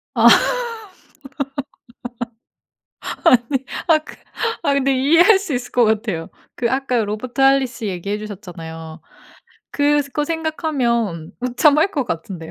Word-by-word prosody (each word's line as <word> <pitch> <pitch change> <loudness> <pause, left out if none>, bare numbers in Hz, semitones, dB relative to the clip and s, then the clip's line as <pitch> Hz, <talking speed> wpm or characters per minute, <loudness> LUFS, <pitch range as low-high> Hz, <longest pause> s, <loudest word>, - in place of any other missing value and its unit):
아. - - +6 3.0
아니 255 +2 +3 0.2
아까. 310 -2 +2 0.5
아 285 -3 +2
근데 275 0 +2
이해할 330 - +5
수 385 -8 -4
있을 245 0 -4
것 245 -1 +4
같아요. 210 -7 -1 0.3
그 235 -1 -1
아까 265 -1 0
Robert 215 +5 -4
Holley씨 270 -4 +3
얘기해 200 +2 -3
주셨잖아요. 170 -6 -9 0.7
그거 290 0 +1
생각하면 260 - -1
웃참할 290 +8 +3
것 280 -7 -1
같은데요. 165 -4 -5
250 Hz, 270 characters per minute, -20 LUFS, 205-285 Hz, 3.0 s, 아